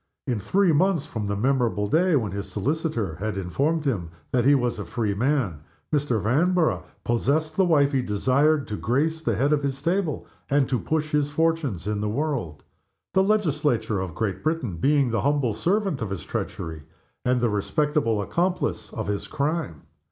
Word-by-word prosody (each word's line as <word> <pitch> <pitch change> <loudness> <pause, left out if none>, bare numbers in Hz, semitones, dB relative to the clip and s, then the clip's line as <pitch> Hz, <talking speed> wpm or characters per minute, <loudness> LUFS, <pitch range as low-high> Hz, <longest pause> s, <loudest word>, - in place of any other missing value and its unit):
In 120 -4 -1
three 190 - +2
months 170 -1 +2
from 110 -9 -4
the 100 - -1
memorable 120 -3 +1
day 170 - +3
when 110 -7 0
his 100 0 -5
solicitor 125 - -1
had 105 +1 -3
informed 145 - 0
him 100 -12 -1 0.2
that 125 -2 +2
he 145 +1 +6
was 120 -4 0
a - - -3
free 105 +3 -2
man, 120 - 0 0.3
Mr. 140 -6 +1
Vanborough 155 - +2 0.2
possessed 150 +7 0
the 190 - +4
wife 145 -5 +4
he 135 -2 +1
desired, 135 +7 +2
to 105 - -3
grace 155 +7 0
the 115 -8 0
head 140 +8 +2
of 145 - +2
his 135 -1 -2
table 170 +1 -1 0.2
and 140 -1 +3
to 125 - 0
push 155 -1 -1
his 150 -1 +1
fortunes 145 - 0
in 105 0 -1
the 105 - -1
world 120 - -2 0.5
the 190 - +4
Legislature 150 - +1
of 90 -4 -4
Great 105 -5 -2
Britain 155 - -1
being 140 - +2
the 115 - 0
humble 140 -5 +1
servant 195 - 0
of 110 - -2
his 95 -5 -4
treachery, 80 -1 -4 0.4
and 125 0 +2
the 120 -1 +2
respectable 115 +1 0
accomplice 170 - -1
of - - -3
his 100 0 -3
crime. 140 - -2
135 Hz, 180 wpm, -25 LUFS, 105-155 Hz, 0.5 s, he